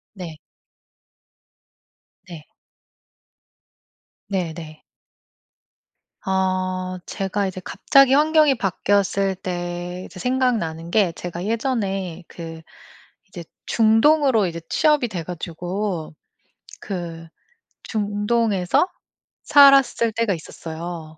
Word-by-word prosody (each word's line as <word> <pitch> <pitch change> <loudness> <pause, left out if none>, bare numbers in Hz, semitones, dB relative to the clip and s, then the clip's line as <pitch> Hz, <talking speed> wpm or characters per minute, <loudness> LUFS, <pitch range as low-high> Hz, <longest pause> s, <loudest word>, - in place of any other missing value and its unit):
네. 170 -5 -8 1.9
네. 165 -4 -10 1.8
네네. 165 -5 -4 1.4
아. 185 -1 -1
제가 195 +1 -2
이제 185 0 -5
갑자기 275 -1 +4
환경이 305 -1 +4
바뀌었을 195 -1 +1
때 175 0 -5
이제 - - -12
생각나는 220 -11 -1
게 190 -2 +3
제가 175 +1 -6
예전에 200 -7 -2
그 165 -1 -9 0.7
이제 175 -3 -9 0.2
중동으로 225 +1 +4
이제 170 -1 -5
취업이 300 -6 +2
돼 180 -5 -4
가지고 175 +1 -4 0.7
그 170 -4 -6 0.6
중동에서 205 - +1 0.6
살았을 275 -5 +6
때가 230 -2 +1
있었어요. 160 -1 -8
190 Hz, 175 characters per minute, -22 LUFS, 175-225 Hz, 1.9 s, 살았을